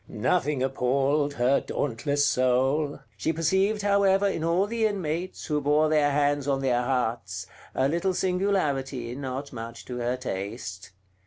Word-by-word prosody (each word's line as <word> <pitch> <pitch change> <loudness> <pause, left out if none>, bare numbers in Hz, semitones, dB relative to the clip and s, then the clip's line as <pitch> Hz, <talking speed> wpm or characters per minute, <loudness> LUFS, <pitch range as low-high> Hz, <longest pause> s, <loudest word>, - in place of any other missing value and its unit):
Nothing 140 -1 0
appalled 135 +3 +1
her 125 +3 +3
dauntless 145 +2 -1
soul; 135 +3 +1 0.2
she 130 - 0
perceived 190 +6 +1
however 200 -1 +3
in 165 -5 -2
all 170 +4 +2
the 225 +1 +1
inmates, 180 -3 -3
who 150 -1 0
bore 150 +2 +3
their 150 -2 +3
hands 145 0 +1
on 135 -1 +1
their 125 -2 +2
hearts, 115 -8 -2 0.3
a 130 - +2
little 170 +5 0
singularity, 145 -11 0
not 135 +1 -5
much 115 0 -7
to 125 - -6
her 120 +1 -1
taste. 100 -4 -5
145 Hz, 145 wpm, -26 LUFS, 125-165 Hz, 0.3 s, her